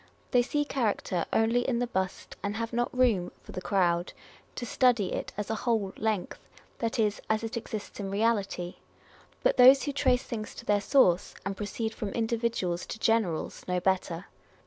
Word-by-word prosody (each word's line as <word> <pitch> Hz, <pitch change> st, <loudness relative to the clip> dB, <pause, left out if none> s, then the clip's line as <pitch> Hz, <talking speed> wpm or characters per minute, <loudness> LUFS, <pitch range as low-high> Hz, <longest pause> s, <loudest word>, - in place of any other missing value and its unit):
They 245 Hz, -, +5 dB
see 295 Hz, +4 st, 0 dB
character 215 Hz, -, -1 dB
only 225 Hz, +2 st, +3 dB
in 245 Hz, -1 st, 0 dB
the 245 Hz, -, +1 dB
bust, 190 Hz, -5 st, -3 dB
and 205 Hz, +1 st, -2 dB
have 230 Hz, +1 st, -3 dB
not 240 Hz, +1 st, 0 dB
room 235 Hz, -8 st, +2 dB
(for -, -, -11 dB
the 185 Hz, -, -5 dB
crowd) 175 Hz, -3 st, +1 dB, 0.4 s
to 240 Hz, -, -4 dB
study 240 Hz, -4 st, +2 dB
it -, -, -3 dB
as 210 Hz, +1 st, -3 dB
a 220 Hz, -, -2 dB
whole 220 Hz, -6 st, 0 dB
length, 215 Hz, -4 st, -2 dB, 0.4 s
that 230 Hz, -1 st, -1 dB
is, 210 Hz, -2 st, +1 dB
as 220 Hz, +1 st, +1 dB
it 225 Hz, +2 st, -4 dB
exists 215 Hz, -3 st, -6 dB
in 195 Hz, -1 st, -3 dB
reality. 200 Hz, -4 st, 0 dB, 0.7 s
But -, -, +3 dB
those 260 Hz, +2 st, +8 dB
who 290 Hz, -, -1 dB
trace 260 Hz, -2 st, +2 dB
things 215 Hz, -5 st, -6 dB
to -, -, -9 dB
their 205 Hz, -1 st, +2 dB
source, 190 Hz, -8 st, +3 dB
and 195 Hz, 0 st, -2 dB
proceed 220 Hz, +2 st, -3 dB
from 210 Hz, -, -4 dB
individuals 225 Hz, -6 st, -1 dB
to -, -, -5 dB
generals, 220 Hz, -7 st, 0 dB
know 180 Hz, 0 st, +1 dB
better. 185 Hz, -1 st, 0 dB
220 Hz, 180 wpm, -29 LUFS, 195-235 Hz, 0.7 s, those